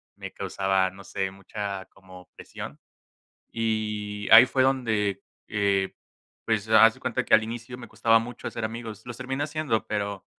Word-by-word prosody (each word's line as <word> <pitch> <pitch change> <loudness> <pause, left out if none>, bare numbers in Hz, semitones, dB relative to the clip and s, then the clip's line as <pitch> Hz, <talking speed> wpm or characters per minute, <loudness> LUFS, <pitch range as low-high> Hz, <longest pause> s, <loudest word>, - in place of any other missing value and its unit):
me - - -8
causaba, 95 -1 0
no 95 +1 -13
sé, 95 +1 -3
mucha, 100 0 -6
como 95 -1 -15
presión - - -9 0.7
y 105 -2 -2
ahí 115 +3 +11
fue 130 0 +1
donde, 110 -7 +1 0.3
eh, 100 -2 0 0.5
pues, 110 -2 0
haz 110 0 +7
de - - -18
cuenta - - -1
que - - +5
al 110 - +6
inicio 120 +2 -6
me 120 -2 -10
costaba 115 +1 +3
mucho 120 +1 -6
hacer 115 -2 -5
amigos. 115 -1 -6
Los 120 0 -8
terminé 135 +2 -2
haciendo, 150 -7 -1
pero 100 -2 -3
110 Hz, 160 wpm, -26 LUFS, 100-115 Hz, 0.7 s, ahí